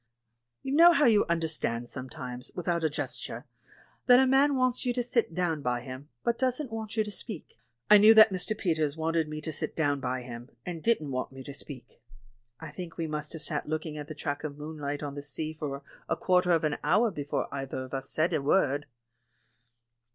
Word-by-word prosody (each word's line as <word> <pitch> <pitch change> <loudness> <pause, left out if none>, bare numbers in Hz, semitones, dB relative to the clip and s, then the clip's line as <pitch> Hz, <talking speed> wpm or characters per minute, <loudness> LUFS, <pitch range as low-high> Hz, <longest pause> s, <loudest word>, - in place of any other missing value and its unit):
You 270 - -3
know 340 +3 +8
how 295 -2 +4
you 220 -4 +5
understand 155 -8 -1
sometimes, 125 -1 -7
without 175 -2 -1
a 160 - +3
gesture, 145 - -5 0.6
that 250 -1 +8
a 265 - +5
man 275 +2 +4
wants 255 -1 +1
you 245 - 0
to 245 0 -1
sit 235 -8 0
down 170 -4 0
by 125 -2 -1
him, 130 +3 -9
but 235 0 0
doesn't 260 0 -1
want 225 0 -5
you 220 - +4
to 210 - -7
speak; 205 -4 -8 0.3
I 210 0 +8
knew 215 +2 +8
that 220 -1 +9
Mr. 190 +3 0
Peters 160 -5 0
wanted 160 0 0
me 155 0 -5
to 160 0 -4
sit - - -2
down 145 -3 +1
by 130 -1 -3
him, 120 +1 -9 0.2
and 170 -2 -5
didn't 155 -11 +1
want 130 0 -3
me 135 0 -10
to 140 - -8
speak. 130 -4 -10 0.6
I 160 -2 -8
think 165 +2 -8
we 165 - -1
must 150 -1 -4
have 160 - -3
sat 150 -1 -2
looking 155 0 -3
at 150 -1 -6
the 155 - -7
track 145 -1 -4
of 145 -2 -5
moonlight 150 -1 -5
on 145 -1 -4
the 145 - -6
sea 155 +2 -3
for 145 -3 -5 0.3
a - - +2
quarter 180 -1 +2
of 165 -2 +3
an 150 -1 0
hour 210 +9 +3
before 145 -4 -3
either 135 -1 -4
of 130 - -11
us 135 0 -2
said 165 +3 +1
a 155 - +1
word. 145 -1 +2
155 Hz, 210 wpm, -29 LUFS, 145-205 Hz, 0.6 s, that